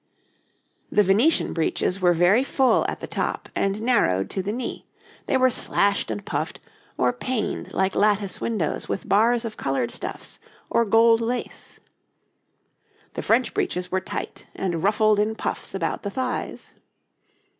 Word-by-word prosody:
] - - -42
The 210 - +7
Venetian 215 - +3
breeches 180 +3 -1
were 180 -1 +5
very 185 +9 +4
full 265 -1 +2
at - - -5
the - - -4
top - - -3
and 195 +2 -1
narrowed 95 - +2
to 190 - -1
the 195 +2 -3
knee; 245 +3 -5 0.4
they 265 - +2
were 255 0 +4
slashed 200 - +1
and 105 -2 -4
puffed, - - -3 0.4
or 125 0 +2
paned 230 - -3
like 190 0 0
lattice 205 -2 +1
windows 210 -10 -2
with - - -3
bars 230 +3 +3
of 220 -2 -6
coloured 135 -3 -1
stuffs - - -5 0.3
or 235 - +3
gold 225 +2 +5
lace. 240 +2 -4 1.3
The - - -4
French - - +2
breeches 180 - -2
were 190 0 0
tight - - -6
and 175 -4 -2
ruffled 210 +2 +3
in 215 +1 +1
puffs - - -4
about 165 -4 -2
the 200 - -4
thighs. 250 +4 -4
205 Hz, 155 wpm, -24 LUFS, 185-230 Hz, 1.3 s, The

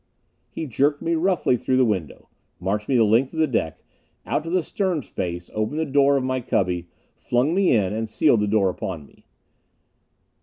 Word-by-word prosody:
He 160 - -5
jerked 145 +3 0
me 165 - 0
roughly 170 -5 +2
through 130 +2 0
the 130 - +4
window. 95 -9 -3 0.3
Marched 105 +3 -2
me 135 - +2
the 115 - +5
length 115 +5 +2
of - - -8
the 160 - +4
deck. 110 - -2 0.4
Out - - -1
to - - -4
the 180 0 +1
stern 180 -5 -2
space; 90 -4 -5
opened 110 +8 -2
the 160 - 0
door 140 0 +3
of 135 - -1
my 130 0 -1
cubby; 90 -6 -1 0.3
flung 125 +6 0
me 195 +1 +3
in 100 -2 +1
and 110 0 -3
sealed 120 0 +3
the 105 - 0
door 100 -3 +2
upon 85 -5 -6
me. - - -24
125 Hz, 195 wpm, -23 LUFS, 105-150 Hz, 0.4 s, the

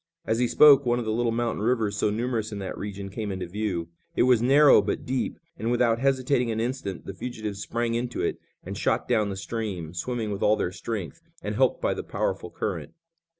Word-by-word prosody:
As 115 - 0
he 125 - +3
spoke 145 +1 +7
one 120 -1 +1
of 120 - -2
the 110 - -1
little 115 +1 +1
mountain 115 -2 -1
rivers 110 -3 +1
so 105 - +1
numerous 115 0 -2
in 105 - -5
that 95 -1 -5
region 100 -1 -6
came 105 0 -4
into 95 -1 -4
view. 90 -3 -3 0.3
It - - +4
was 125 -2 +4
narrow, 140 0 +7
but 100 - -3
deep, 130 0 -2 0.2
and 110 +3 -1
without 120 -1 +2
hesitating 130 -2 +2
an 110 -1 -1
instant 115 -6 -3
the 95 - -6
fugitives 105 -1 -5
sprang 115 +1 -1
into 120 +1 -2
it - - -1 0.2
and - - -6
shot - - 0
down 105 -2 +2
the 100 - -3
stream, 95 -6 -4
swimming 110 +4 -3
with 100 - -4
all 105 - +4
their 90 - -1
strength, 95 -5 -5 0.2
and - - -2
helped - - +2
by - - +2
the - - -4
powerful - - -2
current. - - -4
115 Hz, 215 wpm, -26 LUFS, 100-120 Hz, 0.3 s, spoke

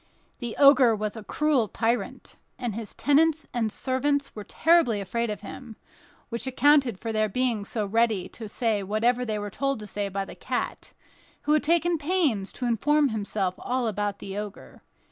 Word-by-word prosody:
This 235 -2 -5
Ogre 270 -5 +6
was 215 0 -3
a 220 - -7
cruel 280 0 +1
tyrant, 230 +3 -2 0.2
and 245 -4 -3
his 220 -1 -7
tenants 315 +2 +2
and 225 -3 0
servants 275 +4 -1
were 210 - -6
terribly 325 -6 +3
afraid 235 +4 -2
of 210 - -4
him, 240 -4 -9 0.5
which 235 +2 -4
accounted 265 -5 +3
for 225 -1 -4
their 215 0 +1
being 240 -1 0
so 210 +1 -3
ready 215 -3 +1
to 220 -3 -9
say 220 -2 0
whatever 225 +5 +1
they 215 -2 -2
were 205 0 -5
told 275 +5 -1
to 210 - -8
say 205 0 -3
by 195 0 -3
the - - -10
cat, - - -4 0.5
who 300 - +2
had 305 - +4
taken 335 +1 +2
pains 290 - +1
to 250 - -4
inform 285 +5 +2
himself 205 -4 -2
all 250 0 -1
about 205 -1 -2
the 195 -1 -7
Ogre. 210 0 -7
230 Hz, 180 wpm, -26 LUFS, 210-275 Hz, 0.5 s, Ogre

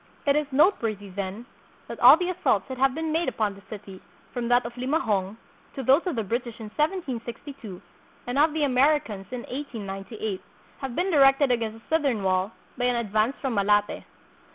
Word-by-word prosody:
It 280 -1 +3
is 300 -1 +1
noteworthy, 225 - +2
then, 200 +4 -5 0.4
that - - -7
all - - +9
the 365 -1 -1
assaults 330 - +1
that 260 -1 -6
have 270 0 +3
been 320 0 -2
made 325 -1 +1
upon 215 -4 -1
the 200 - -14
city, 195 -3 -9 0.3
from 245 -2 -2
that 245 0 +3
of 235 - -5
Limahong, 230 - -1 0.4
to 270 - -4
those 275 +9 +4
of 345 - -1
the 225 - -1
British 235 +2 -3
in 220 -1 -7
1762, 265 - -3 0.5
and 245 +3 -1
of 310 +2 +5
the 310 0 -1
Americans 255 -7 +2
in 250 -1 -5
1898, 215 -6 -5 0.4
have 265 -3 -5
been 370 +2 0
directed 275 -2 +5
against 225 -2 -2
the 320 - +1
southern 270 -10 +1
wall 185 +1 +1 0.3
by 245 - +1
an 250 0 +2
ad 235 -4 -3
vance 220 +5 +2
from 265 -3 -1
Malate. 205 0 +2
245 Hz, 185 wpm, -26 LUFS, 210-280 Hz, 0.5 s, all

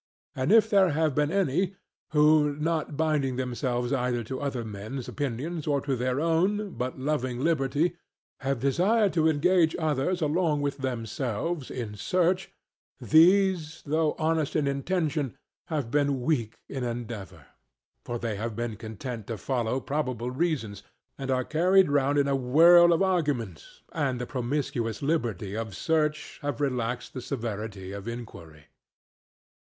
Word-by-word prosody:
And 130 +6 0
if 225 0 +6
there 195 -3 +4
have 155 -1 +1
been 150 +2 +1
any 190 0 +1 0.3
who, 150 -1 +4
not 155 -1 -2
binding 150 -5 +1
themselves 125 0 -2
either 125 -2 0
to 130 +4 -5
other 135 -5 -3
men's 110 +5 -6
opinions 145 +4 -4
or 145 -1 +2
to 135 -1 -1
their 125 +2 -1
own, 185 +6 +1
but 125 -2 -4
loving 130 -2 -2
liberty, 160 +1 +1 0.4
have 135 -2 -1
desired 190 - +2
to 160 -2 +3
engage 160 +2 +3
others 160 +2 0
along 150 -1 +1
with 140 0 -2
themselves 130 +4 -3
in 115 -5 -5
search, 180 - 0 0.5
these, 175 0 +4
though 155 +1 +1
honest 160 -2 0
in 150 - +2
intention, 145 -1 -1 0.3
have 145 -8 -2
been 145 -2 +1
weak 120 -6 -1
in 135 -2 -4
endeavour. 115 - -6 0.6
For 120 - -4
they 115 -3 -3
have 115 +1 -4
been 115 -2 -3
content 110 +1 -7
to 115 - -4
follow 125 +3 -1
probable 130 -5 -2
reasons, 130 - -2 0.3
and 135 -1 -6
are 130 -1 +1
carried 180 +1 +4
round 145 0 +2
in 140 -1 +3
a 140 - +2
whirl 165 +7 +6
of 170 +3 +3
arguments, 145 - -2
and 140 -5 0
in - - -5
the 125 - -3
promiscuous 120 -3 -2
liberty 115 - -1
of 110 -3 -4
search 155 +1 -1
have 145 -4 -3
relaxed 125 -3 -2
the 130 - -5
severity 110 -7 -5
of 100 +2 -7
inquiry. 85 -11 -8
140 Hz, 145 wpm, -27 LUFS, 120-160 Hz, 0.6 s, if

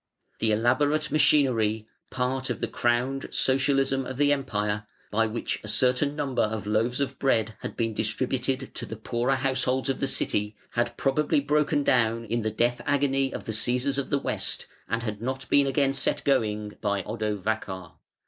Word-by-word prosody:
The 110 - +2
elaborate 145 +8 +2
machinery, 120 -8 +3 0.2
part 130 +1 -1
of - - -2
the - - -1
crowned 125 +3 0
Socialism 135 0 +2
of 130 - -6
the 145 0 +4
Empire, 105 -6 -2 0.2
by 115 +1 +2
which 110 +2 -3
a - - -8
certain 125 +6 +2
number 140 -4 -1
of 110 -2 -1
loaves 110 +4 +1
of 135 -1 -2
bread 110 -5 +1
had - - -7
been 115 -1 0
distributed 130 +4 -1
to - - -5
the 110 - -6
poorer 120 +4 0
householders 130 0 0
of 135 - -1
the 135 - 0
City, 105 -3 -1 0.2
had 120 0 -1
probably 145 +2 +2
broken 150 +1 +1
down 115 -4 +2
in 115 +2 -1
the 110 - 0
death 120 +3 0
agony 135 -1 +2
of - - -6
the - - -4
Cæsars 125 +5 0
of 140 - -4
the 140 - +2
West, - - -2 0.2
and 115 0 -1
had 105 -2 -4
not 130 +2 -3
been 140 -1 +4
again 135 0 +2
set - - 0
going 105 -6 0
by 100 -2 0
Odovacar. 105 -4 -3
125 Hz, 175 wpm, -26 LUFS, 110-135 Hz, 0.2 s, the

